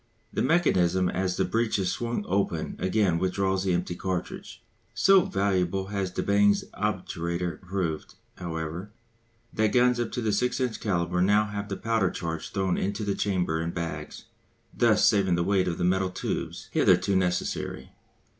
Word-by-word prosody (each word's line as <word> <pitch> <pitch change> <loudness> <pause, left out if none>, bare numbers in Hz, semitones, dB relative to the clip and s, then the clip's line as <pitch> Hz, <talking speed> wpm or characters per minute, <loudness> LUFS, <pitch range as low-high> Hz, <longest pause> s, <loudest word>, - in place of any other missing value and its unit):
The - - 0
mechanism 95 - +2
as 90 0 -1
the 95 - +2
breech 110 +4 0
is 95 -2 0
swung 115 -3 -3
open 95 -4 -1
again 95 -2 +1
withdraws 95 +1 0
the 95 - +2
empty 90 0 -2
cartridge. 90 0 -5 0.3
So 195 -2 +5
valuable 95 -1 0
has 100 -2 -2
de 90 - -3
Bange's 100 0 +3
obturator 85 +1 -3
proved, 90 -4 -3 0.2
however, 85 +2 -5 0.6
that 110 -1 +1
guns 125 0 +4
up 120 - -2
to 125 - -2
the 110 -2 0
6 125 +6 0
inch 125 -3 -1
calibre 90 -3 0
now 105 +3 +4
have 105 0 -5
the 95 - -3
powder 115 -5 +1
charge 80 -1 -4
thrown 95 -2 0
into 100 +3 -2
the 100 -1 0
chamber 90 -6 0
in 85 - -2
bags, 85 -1 -5 0.5
thus 110 -3 +4
saving 95 -4 +3
the 85 - +1
weight 95 0 +2
of 85 - -2
the - - -2
metal 95 +1 +2
tubes 90 - -4
hitherto 100 - +3
necessary. 90 -1 -1
95 Hz, 165 wpm, -27 LUFS, 90-105 Hz, 0.6 s, So